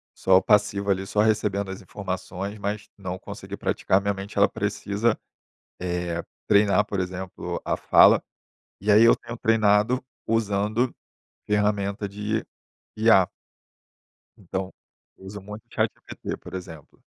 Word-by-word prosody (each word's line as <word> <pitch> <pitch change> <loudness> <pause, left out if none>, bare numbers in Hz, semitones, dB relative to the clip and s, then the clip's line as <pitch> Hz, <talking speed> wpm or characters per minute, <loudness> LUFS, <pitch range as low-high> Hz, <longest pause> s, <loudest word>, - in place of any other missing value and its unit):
só 95 0 +4
passivo, 105 -1 +2
ali, 95 0 +1
só 105 - -1
recebendo 105 -2 +1
as 95 - -7
informações, 95 +1 -5
mas 100 +1 -4
não 95 -2 -5
conseguir - - -8
praticar, 95 +1 +1
minha 100 0 0
mente, 100 +1 -8
ela - - +5
precisa, 105 +3 -1 0.6
eh, 90 -1 -2 0.3
treinar, 100 -1 +4
por 100 -1 -3
exemplo, 95 0 -4
a - - -1
fala, - - +6 0.6
e 105 +2 +2
aí 105 +2 +7
eu 115 - +6
tenho 120 - -8
treinado 110 +2 +3 0.3
usando 110 +2 +1 0.5
ferramenta 105 -1 0
de 105 +2 -2 0.6
IA. 110 -5 +5 1.1
Então, 95 0 -5 0.4
eu - - -17
uso 100 +2 -7
muito 105 +2 -9
ChatGPT, - - -3
por - - -12
exemplo. 85 -5 -9
100 Hz, 130 wpm, -25 LUFS, 95-105 Hz, 1.1 s, aí